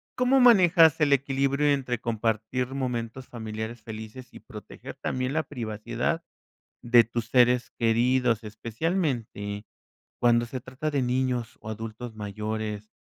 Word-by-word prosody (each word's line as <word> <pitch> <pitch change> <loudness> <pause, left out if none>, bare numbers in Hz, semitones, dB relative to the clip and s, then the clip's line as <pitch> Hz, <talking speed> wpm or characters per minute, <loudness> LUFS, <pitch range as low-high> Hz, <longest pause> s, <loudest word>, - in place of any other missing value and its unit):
¿Cómo 255 +2 +3
manejas 175 - +6
el 145 -2 +4
equilibrio 140 +1 +1
entre 125 -4 -2
compartir 115 +1 -1
momentos 125 -1 -3
familiares 110 0 -6
felices 110 +3 -9
y - - -9
proteger - - -10
también 130 +1 -3
la 160 - +2
privacidad 120 +4 -3 0.6
de 120 -1 +6
tus 115 +1 -4
seres 125 0 +3
queridos, 120 0 +2
especialmente 110 - -3 0.5
cuando 120 -1 +4
se 130 +2 -5
trata 130 +4 -4
de 140 -3 0
niños 125 -1 -1
o 110 - -8
adultos 110 +1 -6
mayores 105 0 -4
120 Hz, 125 wpm, -27 LUFS, 110-135 Hz, 0.6 s, manejas